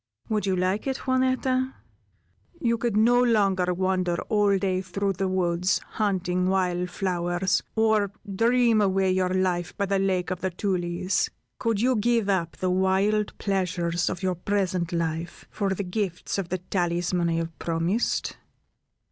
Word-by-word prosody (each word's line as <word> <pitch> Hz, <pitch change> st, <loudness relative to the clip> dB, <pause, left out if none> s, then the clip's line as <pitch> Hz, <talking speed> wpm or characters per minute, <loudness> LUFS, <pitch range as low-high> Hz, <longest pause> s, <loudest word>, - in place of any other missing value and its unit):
Would 210 Hz, -2 st, 0 dB
you 190 Hz, -, +2 dB
like 185 Hz, +6 st, 0 dB
it, 265 Hz, -1 st, -2 dB
Juanetta? 260 Hz, 0 st, +1 dB, 0.8 s
You 235 Hz, -1 st, +1 dB
could 230 Hz, -3 st, 0 dB
no 240 Hz, +3 st, +5 dB
longer 195 Hz, -6 st, +2 dB
wander 185 Hz, -1 st, 0 dB
all 205 Hz, -2 st, +3 dB
day 185 Hz, -1 st, 0 dB
through 195 Hz, +1 st, -2 dB
the 190 Hz, +1 st, -1 dB
woods, 180 Hz, 0 st, +1 dB
hunting 185 Hz, -3 st, -1 dB
wild 180 Hz, -2 st, 0 dB
flowers, 180 Hz, 0 st, 0 dB
or 220 Hz, -3 st, +2 dB, 0.2 s
dream 235 Hz, 0 st, +3 dB
away 190 Hz, -1 st, +2 dB
your 185 Hz, 0 st, +1 dB
life 180 Hz, -2 st, -1 dB
by 200 Hz, -, +1 dB
the 195 Hz, 0 st, 0 dB
Lake 190 Hz, -2 st, 0 dB
of 185 Hz, -, -3 dB
the 190 Hz, -, 0 dB
Tulies. 180 Hz, 0 st, -1 dB, 0.3 s
Could 225 Hz, -3 st, 0 dB
you 255 Hz, +1 st, +3 dB
give 230 Hz, -1 st, +1 dB
up 170 Hz, -4 st, 0 dB
the 185 Hz, -1 st, 0 dB
wild 190 Hz, +3 st, +1 dB
pleasures 175 Hz, -4 st, -1 dB
of 185 Hz, 0 st, -5 dB
your 185 Hz, -1 st, +1 dB
present 180 Hz, -2 st, -1 dB
life, 165 Hz, 0 st, -3 dB
for 195 Hz, -2 st, -1 dB
the 200 Hz, -, -3 dB
gifts 185 Hz, 0 st, -3 dB
of 180 Hz, -3 st, -4 dB
the 185 Hz, -, -1 dB
talisman 175 Hz, -1 st, -1 dB
I -, -, 0 dB
have 165 Hz, 0 st, -3 dB
promised?" 170 Hz, +7 st, -1 dB
190 Hz, 155 wpm, -26 LUFS, 180-205 Hz, 0.8 s, no